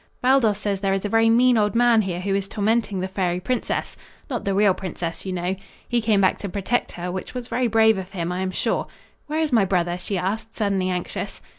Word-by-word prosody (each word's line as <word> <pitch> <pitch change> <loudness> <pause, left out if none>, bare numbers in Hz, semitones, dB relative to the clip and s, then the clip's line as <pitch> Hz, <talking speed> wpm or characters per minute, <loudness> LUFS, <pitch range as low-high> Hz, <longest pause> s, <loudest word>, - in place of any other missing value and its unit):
"Baldos 250 -5 +3
says 200 -2 -2
there 195 0 +1
is 195 - -3
a - - -1
very 225 +1 +4
mean 245 +1 +5
old 210 +1 +1
man 235 -1 +5
here 180 -3 -3
who 195 +1 -1
is 195 0 0
tormenting 210 -1 0
the 185 - -1
fairy 185 -2 -1
princess 250 +6 -2 0.4
not 245 - -3
the 195 -1 0
real 200 -1 +4
princess, 180 -1 -5
you - - -2
know. 180 +1 -1 0.3
He 240 -1 +1
came 215 -2 +2
back 190 - +2
to 200 - -5
protect 205 +6 -1
her, 180 0 -4
which 190 +6 -6
was 245 -1 -4
very 250 0 0
brave 220 -2 +4
of 185 -1 -7
him, 175 -3 -3
I 180 - -2
am 190 0 -1
sure. 185 - -1 0.4
Where 305 +1 -1
is 305 -4 0
my 225 -4 +5
brother?" 175 -2 0
she 190 +2 -3
asked, 210 +5 -3
suddenly 195 -3 0
anxious. 180 -1 -4
200 Hz, 235 wpm, -23 LUFS, 185-225 Hz, 0.4 s, mean